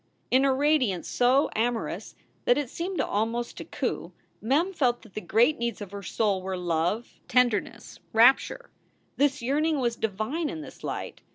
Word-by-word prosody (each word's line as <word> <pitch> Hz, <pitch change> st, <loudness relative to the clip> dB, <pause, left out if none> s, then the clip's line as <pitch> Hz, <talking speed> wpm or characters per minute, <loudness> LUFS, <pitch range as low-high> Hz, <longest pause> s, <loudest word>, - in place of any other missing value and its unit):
In 260 Hz, +2 st, +5 dB
a 275 Hz, -, +4 dB
radiance 265 Hz, -, +1 dB
so 255 Hz, +4 st, +3 dB
amorous 230 Hz, +1 st, -2 dB, 0.3 s
that 245 Hz, -, +4 dB
it 290 Hz, -4 st, -2 dB
seemed 360 Hz, +2 st, -3 dB
almost 230 Hz, +3 st, -1 dB
to -, -, -5 dB
coo, -, -, -3 dB, 0.3 s
Mem 300 Hz, -, +1 dB
felt 250 Hz, -8 st, +1 dB
that 220 Hz, -, -17 dB
the 215 Hz, -, -4 dB
great 240 Hz, +8 st, +3 dB
needs 235 Hz, -2 st, -2 dB
of 205 Hz, -3 st, -8 dB
her 200 Hz, 0 st, -6 dB
soul 200 Hz, 0 st, 0 dB
were 190 Hz, 0 st, -3 dB
love, 175 Hz, +6 st, -1 dB
tender 245 Hz, -4 st, +4 dB
ness, -, -, -13 dB
rapture. 260 Hz, -, +4 dB, 0.5 s
This 285 Hz, -1 st, +2 dB
yearning 300 Hz, +4 st, +1 dB
was 240 Hz, -2 st, 0 dB
divine 225 Hz, -, -2 dB
in 315 Hz, -, -5 dB
this -, -, -12 dB
light. -, -, -5 dB
240 Hz, 170 wpm, -27 LUFS, 215-285 Hz, 0.5 s, In